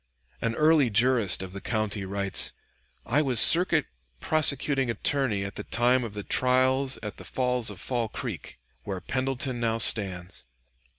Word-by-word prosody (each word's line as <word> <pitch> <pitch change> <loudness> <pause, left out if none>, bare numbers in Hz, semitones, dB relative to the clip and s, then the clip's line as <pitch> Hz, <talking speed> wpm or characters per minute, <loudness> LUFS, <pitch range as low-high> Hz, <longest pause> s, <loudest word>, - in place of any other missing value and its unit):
An 115 0 -2
early 155 -3 +3
jurist 115 -4 +2
of 95 -1 -9
the 100 - -7
country 110 -3 -3
writes: 100 0 -1 0.5
"I 150 - +1
was 130 -6 0
Circuit 170 0 +7 0.3
Prosecuting 140 - +1
Attorney 115 -4 -1
at 100 - -8
the - - -6
time 125 +2 +1
of 110 -3 -8
the 105 - -6
trials 130 +2 +1
at 105 - -7
the - - -11
falls 125 -3 -2
of 100 -4 -9
Fall 120 -3 -3
Creek, - - -7 0.3
where 95 -2 -5
Pendleton 130 +3 -3
now 115 -1 -1
stands. 95 - -1
120 Hz, 155 wpm, -26 LUFS, 100-130 Hz, 0.5 s, Circuit